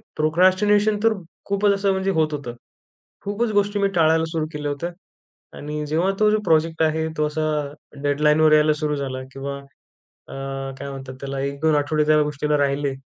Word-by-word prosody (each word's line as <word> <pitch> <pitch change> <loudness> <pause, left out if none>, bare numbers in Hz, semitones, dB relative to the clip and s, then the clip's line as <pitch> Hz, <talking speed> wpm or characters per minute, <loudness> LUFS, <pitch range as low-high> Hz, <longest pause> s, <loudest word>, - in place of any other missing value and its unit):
Procrastination 185 +7 +3
तर 225 -1 +4 0.3
खूपच 200 0 +2
असं 195 0 +1
म्हणजे 190 0 0
होत 155 -1 +1
होतं. 130 -5 -5 0.7
खूपच 215 +3 -1
गोष्टी 205 0 +1
मी 200 - +3
टाळायला 160 0 +3
सुरू 160 -2 -1
केल्या 145 -1 -3
होत्या. 170 +5 -4 0.7
आणि 150 +1 -4
जेव्हा 170 +6 +1
तो 215 0 +4
जो 215 - +2
प्रोजेक्ट 160 0 +2
आहे, 160 0 +1
तो 150 - +2
असा 155 +1 -3 0.6
डेडलाईनवर 150 +2 +3
यायला 150 0 +5
सुरू 150 -1 -1
झाला 130 -2 -4
किंवा 140 +1 -5 0.7
अ, - - -9 0.5
काय 140 0 -6
म्हणतात 135 -1 -8
त्याला 135 0 -4
1-2 140 +3 0
आठवडे 150 +1 +1
त्या 155 0 +5
गोष्टीला 150 0 -1
राहिले. 140 0 0
155 Hz, 165 wpm, -22 LUFS, 145-185 Hz, 0.7 s, यायला